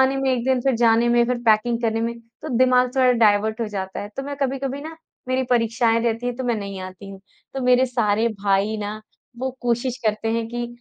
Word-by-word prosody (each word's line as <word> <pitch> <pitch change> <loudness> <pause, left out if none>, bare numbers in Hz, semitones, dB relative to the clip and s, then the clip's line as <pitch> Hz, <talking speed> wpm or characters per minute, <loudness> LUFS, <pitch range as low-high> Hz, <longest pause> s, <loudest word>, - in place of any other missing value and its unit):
आने 265 +1 +3
में 270 -1 0
1 240 -2 -1
दिन 260 -1 +2
फ़िर 265 0 +1
जाने 230 0 +3
में 240 0 +4
फ़िर 250 0 -1
पैकिंग 230 +2 +3
करने 225 -1 0
में 230 +1 -2 0.3
तो - - -5
दिमाग 250 0 +3
थोड़ा 255 -1 +5
डायवर्ट 220 -1 +2
हो 230 - 0
जाता 190 -2 -5
है। 205 - -6
तो 270 - -3
मैं 285 +1 -6
कभी-कभी 275 0 -2
ना 320 +2 -8 0.3
मेरी 260 0 +1
परीक्षाएँ 230 -1 +2
रहती 230 +1 -1
हैं 245 - -1
तो 260 - -4
मैं 240 -2 +1
नहीं 200 -2 -6
आती 185 +1 -9
हूँ। 195 -1 -11 0.3
तो 270 - -3
मेरे 250 +1 +4
सारे 230 -2 +1
भाई 200 +2 +1
ना 210 +1 -5 0.4
वो 260 +1 -2
कोशिश 245 +1 -1
करते 215 +1 0
हैं 230 0 -1
कि 240 0 -4
235 Hz, 230 wpm, -22 LUFS, 220-255 Hz, 0.4 s, थोड़ा